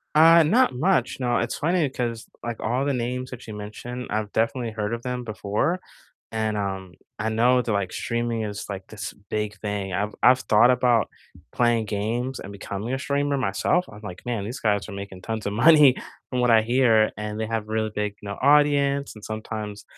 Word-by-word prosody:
Uh, 165 +2 +8
not 175 - +3
much. 180 +9 +1
No, 120 -2 +1
it's 120 - -2
funny, 165 -2 +1
'cause, 120 -3 -4
like, 120 -1 -4
all 125 +5 0
the 140 - +1
names 125 +1 -3
that 125 -1 -9
you 110 - -6
mentioned, 120 +4 -7
I've 105 -1 -2
definitely 115 +1 0
heard 105 0 -3
of 115 - -3
them 125 -1 -3
before, 110 - -1 0.5
and, 110 -1 -1
um, 95 -3 -4 0.2
I 110 +2 -1
know 120 +3 +3
that, 120 -2 -3
like, 100 -3 -1
streaming 115 -1 -2
is, 105 -2 -4
like, 95 -1 -6
this 105 -3 -7
big 105 +1 -4
thing. 100 -2 -4
I've 105 +3 -2
I've 125 +1 +6
thought 120 +1 +5
about 125 -2 +2 0.4
playing 120 -2 +2
games 115 +6 -2
and 100 - -8
becoming 100 +4 -4
a 135 - -2
streamer 140 0 0
myself. 130 - +1
I'm 105 - -11
like, 90 -4 -8
"Man, 115 -5 -2
these 120 +5 -6
guys 105 -2 0
are 105 - -7
making 100 -1 -7
tons 110 0 -4
of 100 - -1
money 145 +3 +7 0.4
from 125 -1 -1
what 125 - +3
I 110 -1 +6
hear, 115 -2 +3
and 105 0 -4
they 110 - -1
have 110 -1 -2
a - - -6
really 110 -1 0
big, 105 -1 -2
you 100 - -7
know, 100 - -5
audience," 140 0 +3
and 105 - -13
sometimes 110 -1 -6
115 Hz, 205 wpm, -24 LUFS, 105-125 Hz, 0.5 s, Uh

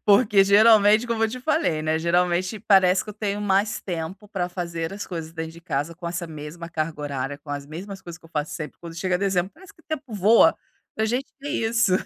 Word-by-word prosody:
porque 205 -1 +5
geralmente 210 +2 +6
como 230 -1 -1
eu 225 - +3
te 250 +3 -6
falei, 250 - 0
né, 155 0 +1
geralmente 180 +4 +1
parece 190 -3 +4
que 210 - -7
eu - - -10
tenho 205 -1 -2
mais 205 +1 +1
tempo 180 +3 -5
pra 180 -4 -2
fazer 170 -1 -4
as 205 +1 -6
coisas 165 -2 -6
dentro 160 -1 -5
de 170 - -13
casa 160 -1 -3
com 170 0 -6
essa 170 0 -4
mesma 160 +2 -8
carga 155 -1 -3
horária, 140 -1 -3
com 145 0 -20
as 145 -1 -4
mesmas 190 +6 -8
coisas 170 -1 -9
que 170 - -32
eu - - -14
faço 150 -1 -3
sempre. 155 -2 -7
Quando 170 -1 -9
chega 185 0 0
dezembro 190 -1 0
parece 380 +4 -15
que - - -24
tempo 290 -7 -5
voa, 210 +3 +5 0.4
pra 220 - +1
gente 245 +5 -2
ver 285 +1 -5
isso. 225 -4 +1
185 Hz, 225 wpm, -24 LUFS, 165-210 Hz, 0.4 s, geralmente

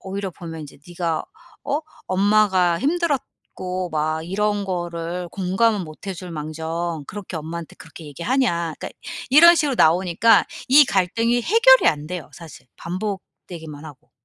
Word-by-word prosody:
오히려 195 0 -5
보면 165 -2 -8
이제 145 - -12
"네가 170 -2 -2 0.4
어? 290 +2 -1 0.3
엄마가 190 -3 +3
힘들었고 270 - -2
막 155 +1 -1
이런 205 +2 -1
거를 175 -1 -4
공감은 195 +3 +1
못 155 +5 -12
해줄망정 165 -2 -5
그렇게 195 -4 -7
엄마한테 165 +1 -7
그렇게 160 0 -13
얘기하냐." 170 - -1
그러니까 - - -5 0.4
이런 340 +5 +8
식으로 285 -5 0
나오니까 180 +6 +4 0.2
이 290 +3 +8
갈등이 230 +5 +1
해결이 485 - +5
안 150 -1 -1
돼요 180 -5 -6
사실, 160 -6 -13
반복되기만 175 -5 -7
하고. 150 0 -13
180 Hz, 320 characters per minute, -22 LUFS, 165-210 Hz, 0.4 s, 이런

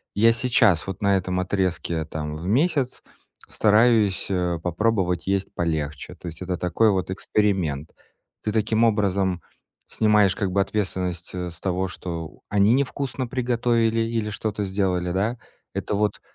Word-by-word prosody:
я 115 +3 +6
сейчас 115 -7 +3
вот 95 - -5
на 100 -1 +3
этом 90 0 -2
отрезке, 90 -4 -1
там, 75 -1 -5
в 85 - -6
месяц 135 - +1 0.5
стараюсь, 110 -2 +3
э, 90 -2 0
попробовать 90 -1 0
есть 95 0 -1
полегче. 75 -3 -3
То 90 - -10
есть 80 +1 -8
это 90 0 -2
такой 90 +5 +2
вот 95 -1 -1
эксперимент. 95 -8 0 0.5
Ты 105 - -1
таким 110 +1 +2
образом 100 -4 +1 0.5
снимаешь 105 -3 +3
как 100 -3 -1
бы 100 +1 +2
ответственность, 90 -4 -2
э, 90 -1 -3
с 80 - -9
того, 95 0 -1
что 85 -3 -6
они 100 +2 +4
невкусно 130 -1 -1
приготовили 120 -2 +1
или 115 -1 -1
что-то 105 0 -3
сделали, 95 -2 0
да? 105 +6 0 0.4
Это - - -3
вот 105 0 0
100 Hz, 145 wpm, -24 LUFS, 90-110 Hz, 0.5 s, я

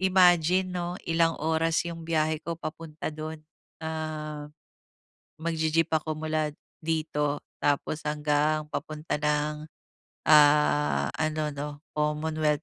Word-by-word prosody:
imagine, 185 -1 +4
'no, 175 0 -3
Ilang 165 0 +3
oras 160 +1 +2
'yong 170 -1 -5
biyahe 155 -1 +1
ko 170 0 -3
papunta 160 -1 -5
do'n. 155 0 -6 0.4
Ah, 155 -2 -4 0.9
magji-jeep 165 0 +1
ako 155 0 0
mula 155 -1 0 0.3
dito, 155 -2 -1 0.2
tapos 145 +2 +1
hanggang 150 +1 +1
papunta 155 +1 -3
ng, 150 0 0 0.6
ah, 75 - +5
ano, 155 -1 0
'no, 145 +1 -4 0.3
Commonwealth. 150 0 +1
155 Hz, 105 wpm, -28 LUFS, 150-160 Hz, 0.9 s, ah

